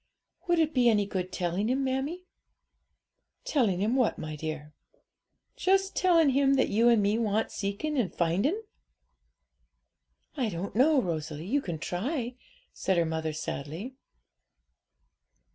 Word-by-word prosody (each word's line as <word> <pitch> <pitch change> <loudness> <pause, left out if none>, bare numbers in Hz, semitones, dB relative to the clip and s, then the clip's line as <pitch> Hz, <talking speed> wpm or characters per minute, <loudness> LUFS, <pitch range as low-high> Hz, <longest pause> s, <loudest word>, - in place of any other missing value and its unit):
'Would 345 -1 +3
it 320 -1 +2
be 245 -2 +4
any 210 -3 +3
good 185 -2 -4
telling 180 +5 -1
Him, 265 +2 +1
mammie?' 275 +7 -2 1.2
'Telling 210 - +1
Him 220 +5 +1
what, 255 -4 +2
my 155 0 -5
dear?' 150 0 -6 0.8
'Just 385 -4 +1
telling 335 -6 +4
Him 275 +1 +3
that 265 - +2
you 230 +3 +4
and 230 -3 +4
me 205 +3 +2
want 220 -1 0
seeking 215 +9 -2
and 195 -8 0
finding.' 200 - 0 1.7
'I 250 -5 0
don't 195 +2 -5
know, 280 +5 +5
Rosalie; 155 - -3
you 275 +9 +1
can 175 -10 -4
try,' 240 - -3 0.4
said 190 -2 0
her 170 - +3
mother 160 -1 -2
sadly. 155 - -5
220 Hz, 135 wpm, -28 LUFS, 175-275 Hz, 1.7 s, know